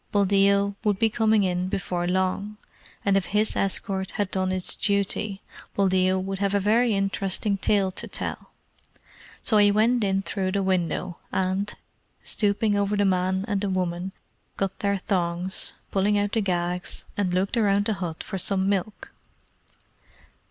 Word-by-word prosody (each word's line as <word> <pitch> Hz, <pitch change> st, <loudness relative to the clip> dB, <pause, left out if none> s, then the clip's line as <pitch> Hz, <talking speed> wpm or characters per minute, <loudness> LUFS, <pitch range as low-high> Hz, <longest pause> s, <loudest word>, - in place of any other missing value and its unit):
Buldeo 200 Hz, 0 st, +3 dB
would 210 Hz, -3 st, +2 dB
be 225 Hz, +2 st, +2 dB
coming 220 Hz, -2 st, +3 dB
in 180 Hz, -1 st, 0 dB
before 180 Hz, -2 st, -2 dB
long, 190 Hz, +3 st, -1 dB, 0.5 s
and 200 Hz, -1 st, +3 dB
if 195 Hz, -2 st, +2 dB
his 210 Hz, +3 st, +1 dB
escort 190 Hz, -1 st, 0 dB
had 205 Hz, -3 st, -1 dB
done 185 Hz, -1 st, 0 dB
its 185 Hz, -1 st, -1 dB
duty, 200 Hz, 0 st, 0 dB, 0.3 s
Buldeo 185 Hz, -1 st, +3 dB
would 190 Hz, +1 st, -3 dB
have 200 Hz, 0 st, +1 dB
a -, -, +4 dB
very 225 Hz, +4 st, +3 dB
interesting 195 Hz, +1 st, 0 dB
tale 195 Hz, -1 st, +1 dB
to -, -, -4 dB
tell. -, -, -5 dB, 0.9 s
So 220 Hz, -, +3 dB
he 205 Hz, 0 st, +6 dB
went 225 Hz, +3 st, +3 dB
in 195 Hz, -1 st, +1 dB
through 190 Hz, -2 st, -2 dB
the 200 Hz, -1 st, +1 dB
window, 185 Hz, -1 st, -1 dB
and, 190 Hz, +2 st, 0 dB, 0.5 s
stooping 205 Hz, 0 st, +1 dB
over 200 Hz, +1 st, +1 dB
the 205 Hz, -, +3 dB
man 185 Hz, 0 st, +1 dB
and 200 Hz, -3 st, -1 dB
the 200 Hz, -, -1 dB
woman, 180 Hz, 0 st, -2 dB, 0.5 s
cut 195 Hz, -1 st, -2 dB
their 200 Hz, 0 st, +1 dB
thongs, 180 Hz, -1 st, -1 dB, 0.2 s
pulling 205 Hz, +1 st, +2 dB
out 205 Hz, 0 st, 0 dB
the 225 Hz, -, +1 dB
gags, 180 Hz, -1 st, -2 dB
and 195 Hz, -3 st, 0 dB
looked 185 Hz, +5 st, 0 dB
round 205 Hz, -3 st, +2 dB
the 220 Hz, -, +1 dB
hut 175 Hz, -5 st, -5 dB
for 195 Hz, -, -4 dB
some 190 Hz, +1 st, 0 dB
milk. 200 Hz, +1 st, -2 dB
195 Hz, 160 wpm, -25 LUFS, 185-205 Hz, 0.9 s, he